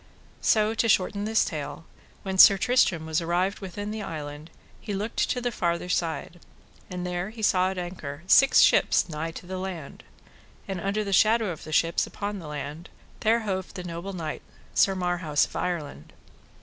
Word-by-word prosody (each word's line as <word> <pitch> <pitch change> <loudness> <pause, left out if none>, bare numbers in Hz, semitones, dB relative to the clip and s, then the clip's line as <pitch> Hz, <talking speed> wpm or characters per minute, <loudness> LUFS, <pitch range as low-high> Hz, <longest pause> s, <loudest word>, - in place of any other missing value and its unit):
So 215 0 +3
to 225 0 +1
shorten 200 +1 +2
this 220 +1 +2
tale, 155 +1 -6 0.4
when 190 -1 -3
Sir 195 - +10
Tristram 190 -8 +2
was 160 +1 0
arrived 180 +4 0
within 205 +2 -6
the 215 0 -4
island 150 -3 -7 0.3
he 205 - -5
looked 210 +4 -1
to 250 - 0
the 245 0 -2
farther 170 -3 -1
side, 170 0 -2 0.5
and 180 -1 -5
there 180 +2 -3
he 220 0 -9
saw 185 -2 +3
at 190 - -5
an 180 - -2
anchor 155 -4 -8
six 270 +8 +6
ships - - +4
nigh 160 0 -4
to 165 - -9
the 185 +1 -5
land; 180 -6 -7 0.6
and 190 -3 -4
under 200 +3 -1
the 200 -1 -3
shadow 220 0 +4
of 160 - -9
the 155 - -8
ships 165 +2 +2
upon 205 0 -5
the 165 - -9
land, 150 +3 -6 0.3
there 230 +1 +2
hoved 190 -3 -4
the 180 - -5
noble 175 +3 -6
knight, 160 -4 -5 0.3
Sir 195 - +3
Marhaus 175 -5 +1
of - - -14
Ireland. 155 - -4
180 Hz, 185 wpm, -26 LUFS, 165-200 Hz, 0.6 s, Sir